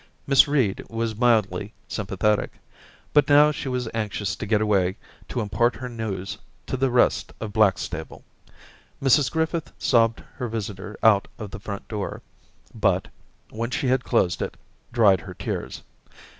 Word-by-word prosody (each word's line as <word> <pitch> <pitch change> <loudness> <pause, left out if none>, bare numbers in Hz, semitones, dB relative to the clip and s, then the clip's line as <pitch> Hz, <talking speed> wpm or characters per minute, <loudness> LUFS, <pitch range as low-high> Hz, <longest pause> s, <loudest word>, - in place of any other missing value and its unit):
Miss 135 +1 +6
Reed 130 -9 +1
was 115 -1 -2
mildly 110 -4 +1
sympathetic; 105 +1 0 0.6
but 145 -2 +4
now 145 +1 +7
she 140 -2 -4
Daisy 125 -1 -1
231 - - -7
was 110 - -6 0.2
anxious 100 -2 -3
to - - -5
get 105 0 +3
away 100 -3 +1 0.3
to 120 - -2
impart 115 +3 +1
her 125 +3 -6
news 105 -5 -4 0.3
to - - -3
the 135 +1 +1
rest 125 0 +2
of 110 -2 -5
Blackstable. 95 -6 0 0.8
Mrs 140 0 +4
Griffith 160 0 -1
sobbed 115 -2 +2 0.2
her 125 - -2
visitor 105 -2 -5
out 105 -2 +5
of 105 -2 -7
the - - -7
front 100 0 -7
door, 105 -3 -4 0.5
but, - - +1 0.4
when 115 +2 -3
she 125 +1 -1
had 130 0 +2
closed 90 -7 +1
it, - - -4 0.3
dried 105 -6 +4
her - - -9
tears. - - -5
110 Hz, 155 wpm, -24 LUFS, 100-125 Hz, 0.8 s, now